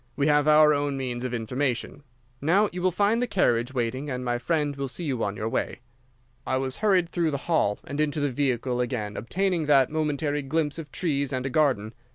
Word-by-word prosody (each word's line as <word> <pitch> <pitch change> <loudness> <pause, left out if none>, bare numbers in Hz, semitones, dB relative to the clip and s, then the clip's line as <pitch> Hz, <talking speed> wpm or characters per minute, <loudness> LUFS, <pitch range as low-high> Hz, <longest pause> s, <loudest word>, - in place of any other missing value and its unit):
'We 140 - +1
have 150 0 +3
our 150 0 +6
own 145 -1 -1
means 125 -2 -3
of 130 - -2
information. 125 +3 -2 0.4
Now 190 +8 +3
you 180 - -4
will 185 - +3
find 205 +6 +1
the 245 - 0
carriage 120 - +1
waiting, 130 +3 -2
and 125 -1 -4
my 120 0 0
friend 150 +2 0
will 140 0 -3
see 135 +7 -5
you 135 -7 -1
on 100 0 -2
your 110 - -2
way.' 115 - -2 0.6
"I 130 - 0
was 130 0 -3
hurried 190 -5 +3
through 170 -1 0
the 140 -2 -4
hall 160 -12 +2
and 145 +2 -3
into 150 0 0
the 145 -1 0
vehicle, 125 -2 0
again 110 -4 -3
obtaining 175 - -1
that 140 -3 +4
momentary 150 -1 -1
glimpse 150 +2 -1
of 150 -4 -8
trees 140 -6 -1
and 130 0 -2
a 135 - -2
garden. 125 -8 +1
140 Hz, 210 wpm, -26 LUFS, 125-155 Hz, 0.6 s, our